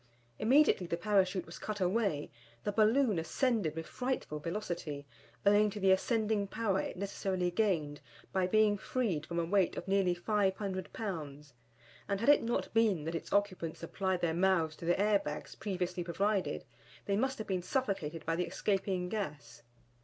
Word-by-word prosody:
Immediately 255 Hz, -, +4 dB
the 170 Hz, -, -1 dB
Parachute 190 Hz, -1 st, +2 dB
was 170 Hz, -, -10 dB
cut 210 Hz, -1 st, -4 dB
away, 185 Hz, -5 st, 0 dB, 0.3 s
the 205 Hz, -, 0 dB
balloon 220 Hz, -1 st, +3 dB
ascended 205 Hz, -, 0 dB
with 165 Hz, 0 st, -4 dB
frightful 250 Hz, -12 st, -3 dB
velocity, 165 Hz, -4 st, -4 dB, 0.4 s
owing 205 Hz, +1 st, +5 dB
to 205 Hz, -, -6 dB
the 190 Hz, -1 st, +4 dB
ascending 215 Hz, +1 st, +1 dB
power 200 Hz, -2 st, 0 dB
it -, -, -5 dB
necessarily 190 Hz, -2 st, -1 dB
gained 170 Hz, -8 st, 0 dB, 0.3 s
by 185 Hz, -1 st, +2 dB
being 210 Hz, 0 st, +3 dB
freed 190 Hz, -, -1 dB
from 170 Hz, -, -4 dB
a 170 Hz, -, +1 dB
weight 190 Hz, +1 st, +2 dB
of -, -, -5 dB
nearly 190 Hz, -2 st, +2 dB
500 190 Hz, 0 st, -1 dB
pounds; 150 Hz, -, -6 dB, 0.6 s
and 200 Hz, -1 st, 0 dB
had 235 Hz, -, +2 dB
it 290 Hz, -, +7 dB
not 235 Hz, +1 st, -2 dB
been 215 Hz, -8 st, +3 dB
that 165 Hz, +2 st, -3 dB
its 165 Hz, -, -5 dB
occupants 185 Hz, -6 st, 0 dB
applied 185 Hz, +1 st, -1 dB
their 170 Hz, -2 st, +1 dB
mouths 170 Hz, -3 st, +2 dB
to -, -, -8 dB
the 175 Hz, +2 st, +2 dB
air 205 Hz, 0 st, +4 dB
bags 150 Hz, -4 st, -6 dB
previously 180 Hz, -3 st, -3 dB
provided, 190 Hz, -, -1 dB, 0.4 s
they 200 Hz, -, +1 dB
must 265 Hz, +5 st, 0 dB
have 220 Hz, -, -5 dB
been 185 Hz, -2 st, -1 dB
suffocated 180 Hz, -, -2 dB
by 165 Hz, -, 0 dB
the 175 Hz, +1 st, -1 dB
escaping 190 Hz, 0 st, -1 dB
gas. 150 Hz, -, -5 dB
190 Hz, 170 wpm, -33 LUFS, 170-210 Hz, 0.6 s, it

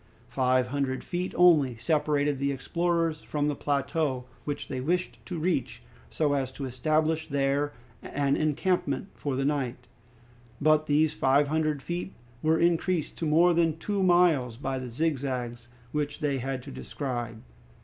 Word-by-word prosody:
Five 130 Hz, 0 st, +2 dB
hundred 135 Hz, -1 st, -1 dB
feet 180 Hz, +1 st, -3 dB
only 155 Hz, -9 st, +5 dB
separated 145 Hz, +2 st, +1 dB
the 140 Hz, 0 st, +1 dB
explorers 165 Hz, +3 st, 0 dB
from 150 Hz, -1 st, -1 dB
the 145 Hz, -, -1 dB
plateau, 140 Hz, -2 st, -1 dB, 0.2 s
which 145 Hz, -1 st, -4 dB
they 130 Hz, -1 st, -3 dB
wished 175 Hz, +6 st, -1 dB
to 180 Hz, -, -4 dB
reach 160 Hz, -6 st, -1 dB, 0.3 s
so 150 Hz, -2 st, +1 dB
as 135 Hz, -2 st, -1 dB
to 135 Hz, -, -5 dB
establish 155 Hz, +4 st, 0 dB
there 140 Hz, +1 st, +1 dB, 0.3 s
an 140 Hz, -1 st, 0 dB
encampment 155 Hz, +1 st, 0 dB
for 140 Hz, -3 st, -3 dB
the 135 Hz, +1 st, 0 dB
night, 130 Hz, -4 st, -1 dB, 0.7 s
but 155 Hz, +1 st, +3 dB
these 150 Hz, +1 st, +3 dB
five 140 Hz, 0 st, +3 dB
hundred 155 Hz, -2 st, 0 dB
feet 175 Hz, +2 st, -4 dB, 0.3 s
were 160 Hz, +1 st, +3 dB
increased 170 Hz, 0 st, +1 dB
to 165 Hz, -, -1 dB
more 170 Hz, +3 st, +5 dB
than 165 Hz, -2 st, +2 dB
two 200 Hz, +3 st, -2 dB
miles 170 Hz, -10 st, +3 dB
by 135 Hz, 0 st, -3 dB
the 130 Hz, -1 st, -6 dB
zigzags 125 Hz, -4 st, -2 dB, 0.2 s
which 145 Hz, 0 st, -2 dB
they 145 Hz, -4 st, 0 dB
had 130 Hz, 0 st, -3 dB
to -, -, -9 dB
describe. 120 Hz, -5 st, -4 dB
145 Hz, 150 wpm, -28 LUFS, 135-160 Hz, 0.7 s, only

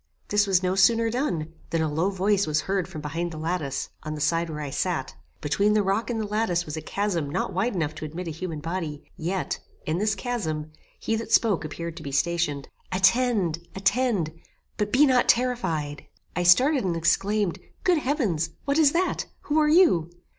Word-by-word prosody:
This 205 Hz, 0 st, +3 dB
was 190 Hz, -1 st, +3 dB
no 180 Hz, 0 st, +1 dB
sooner 225 Hz, +4 st, +4 dB
done, 175 Hz, -, -2 dB, 0.2 s
than 165 Hz, -1 st, 0 dB
a -, -, +1 dB
low 160 Hz, +6 st, 0 dB
voice 200 Hz, 0 st, +1 dB
was 155 Hz, 0 st, +1 dB
heard 190 Hz, +1 st, -1 dB
from 165 Hz, -5 st, -7 dB
behind 165 Hz, +4 st, -3 dB
the 160 Hz, -, -7 dB
lattice, 160 Hz, -3 st, -2 dB
on 155 Hz, 0 st, -5 dB
the -, -, -6 dB
side 165 Hz, +3 st, +1 dB
where 155 Hz, -1 st, -5 dB
I 145 Hz, -2 st, -4 dB
sat. 145 Hz, -1 st, -2 dB, 0.3 s
Between 200 Hz, +8 st, +2 dB
the 210 Hz, -, +3 dB
rock 200 Hz, +5 st, 0 dB
and 235 Hz, -2 st, -1 dB
the 215 Hz, -, -1 dB
lattice 205 Hz, -5 st, 0 dB
was 150 Hz, -, -5 dB
a 160 Hz, -, -4 dB
chasm 175 Hz, -4 st, -2 dB
not -, -, -2 dB
wide 200 Hz, +5 st, 0 dB
enough 155 Hz, -4 st, -1 dB
to 155 Hz, 0 st, -7 dB
admit 170 Hz, +4 st, -6 dB
a -, -, -2 dB
human 160 Hz, -1 st, -5 dB
body; 165 Hz, -3 st, -4 dB
yet, 185 Hz, +2 st, -2 dB, 0.3 s
in 160 Hz, +3 st, -1 dB
this 210 Hz, +1 st, +1 dB
chasm 160 Hz, -10 st, -3 dB, 0.3 s
he 225 Hz, -, -1 dB
that 225 Hz, -, -6 dB
spoke 210 Hz, -8 st, +3 dB
appeared 165 Hz, +2 st, -5 dB
to -, -, -7 dB
be 140 Hz, -, -6 dB
stationed. 145 Hz, 0 st, 0 dB, 0.2 s
"Attend! 190 Hz, -2 st, +2 dB, 0.2 s
attend! 195 Hz, -4 st, +1 dB, 0.4 s
but 210 Hz, 0 st, -1 dB
be 275 Hz, +6 st, +6 dB
not 255 Hz, -3 st, +3 dB
terrified." 170 Hz, -, 0 dB, 0.3 s
I 180 Hz, -, 0 dB
started 255 Hz, -, +5 dB
and 175 Hz, -3 st, 0 dB
exclaimed, 195 Hz, +3 st, +1 dB, 0.2 s
"Good 355 Hz, -3 st, +3 dB
heavens! 225 Hz, -, 0 dB, 0.2 s
what 280 Hz, +2 st, +1 dB
is 290 Hz, -3 st, +5 dB
that? 360 Hz, +2 st, 0 dB
Who 300 Hz, +1 st, +1 dB
are 300 Hz, -1 st, +3 dB
you?" 300 Hz, -, +5 dB
180 Hz, 195 wpm, -25 LUFS, 160-215 Hz, 0.4 s, be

